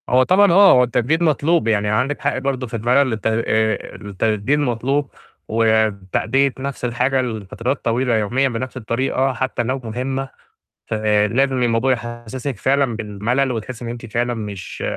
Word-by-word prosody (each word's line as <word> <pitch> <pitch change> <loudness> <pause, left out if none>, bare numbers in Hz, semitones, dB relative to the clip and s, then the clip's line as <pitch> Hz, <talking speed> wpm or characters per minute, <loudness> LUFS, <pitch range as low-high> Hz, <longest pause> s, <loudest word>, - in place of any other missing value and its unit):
هو 130 +1 +5
طبعًا 190 +6 +4
آه، 195 +3 +7
هو 125 - +6
التجديد 125 +7 0
مطلوب، 155 -3 +2
يعني 105 -2 +1
عندِك 130 +7 0
حق - - 0
برضه 130 -1 -2
في 115 - -15
المَلَل 125 +3 +2
الت 110 - -2
آآ 110 -1 0
التجديد 105 +6 -1
المطلوب، 135 +2 0 0.4
وتأدية 110 +3 +1
نَفْس 135 -1 -4
الحاجة 125 +2 +1
لفترات 115 +2 -4
طويلة 120 +1 +1
يوميًا 125 +6 +1
بنَفْس 130 +2 -5
الطريقة 130 +3 -1
حتّى 125 0 -2
لو 130 +3 -2
مهمّة، 130 +4 -3 0.6
فلازم 110 +5 +1
الموضوع 120 +2 +2
يحسِّسك 120 +2 -4
فعلًا 135 +1 +1
بالمَلَل 115 +5 -1
وتحس 120 +1 -5
إن 120 - -5
أنتِ 120 0 -7
فعلًا 120 +2 -1
مش 105 -4 -6
120 Hz, 150 wpm, -20 LUFS, 110-135 Hz, 0.6 s, آه